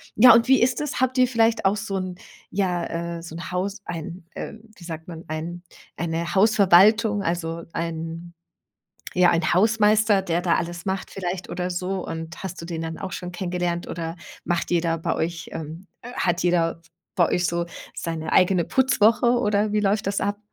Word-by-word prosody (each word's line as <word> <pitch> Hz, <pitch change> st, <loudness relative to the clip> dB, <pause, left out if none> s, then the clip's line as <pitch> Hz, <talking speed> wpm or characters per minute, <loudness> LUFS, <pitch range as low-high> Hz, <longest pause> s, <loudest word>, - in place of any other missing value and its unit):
Ja, 245 Hz, +1 st, +9 dB
und 230 Hz, +1 st, +4 dB
wie 265 Hz, 0 st, +5 dB
ist 250 Hz, +1 st, +2 dB
das? 295 Hz, -3 st, -3 dB
Habt 260 Hz, 0 st, +1 dB
ihr 255 Hz, -, +6 dB
vielleicht 230 Hz, -3 st, +2 dB
auch 195 Hz, +2 st, +3 dB
so 200 Hz, -1 st, -3 dB
'n 185 Hz, -1 st, -4 dB, 0.3 s
ja, 170 Hz, -3 st, -2 dB
äh, -, -, -8 dB
so 165 Hz, -1 st, -9 dB
'n 170 Hz, +2 st, -7 dB
Haus, 190 Hz, +3 st, -2 dB
ein 170 Hz, +1 st, -6 dB
wie, -, -, -6 dB
ähm, 220 Hz, 0 st, -8 dB
sagt 165 Hz, -2 st, -7 dB
man, 165 Hz, -2 st, -8 dB
ein 165 Hz, +3 st, -5 dB, 0.3 s
eine 170 Hz, 0 st, -2 dB
Hausverwaltung, 205 Hz, +1 st, +5 dB
also 170 Hz, -1 st, -2 dB
einen 165 Hz, +1 st, -5 dB, 0.8 s
ja, 180 Hz, -1 st, +6 dB
einen 170 Hz, +1 st, +1 dB
Hausmeister, 210 Hz, 0 st, +4 dB
der 175 Hz, -1 st, -1 dB
da 175 Hz, -2 st, +2 dB
alles 175 Hz, +2 st, -4 dB
macht 190 Hz, 0 st, -2 dB
vielleicht 185 Hz, -1 st, -4 dB
oder 180 Hz, +1 st, -3 dB
so? 180 Hz, +1 st, -3 dB
Und 165 Hz, +1 st, -6 dB
hast 190 Hz, -1 st, -6 dB
du -, -, -7 dB
den 165 Hz, -1 st, -4 dB
dann 165 Hz, 0 st, -5 dB
auch 190 Hz, -3 st, -6 dB
schon 180 Hz, 0 st, -5 dB
kennengelernt, 175 Hz, -1 st, -2 dB
oder 165 Hz, 0 st, -5 dB, 0.3 s
macht 175 Hz, 0 st, -1 dB
jeder 165 Hz, -1 st, +1 dB
bei 160 Hz, -, -1 dB
euch, 165 Hz, 0 st, -3 dB
ähm 160 Hz, +4 st, -7 dB, 0.2 s
hat 185 Hz, -7 st, -1 dB
jeder 170 Hz, -2 st, +1 dB, 0.3 s
bei 175 Hz, -3 st, +4 dB
euch 180 Hz, 0 st, +1 dB
so 170 Hz, 0 st, -1 dB, 0.3 s
seine 165 Hz, -1 st, -4 dB
eigene 180 Hz, -1 st, +4 dB
Putzwoche, 235 Hz, -2 st, +3 dB
oder 210 Hz, -2 st, +1 dB
wie 210 Hz, -, +2 dB
läuft 200 Hz, 0 st, +1 dB
das 200 Hz, -, -1 dB
ab? 205 Hz, 0 st, -1 dB
180 Hz, 185 wpm, -24 LUFS, 170-205 Hz, 0.8 s, Ja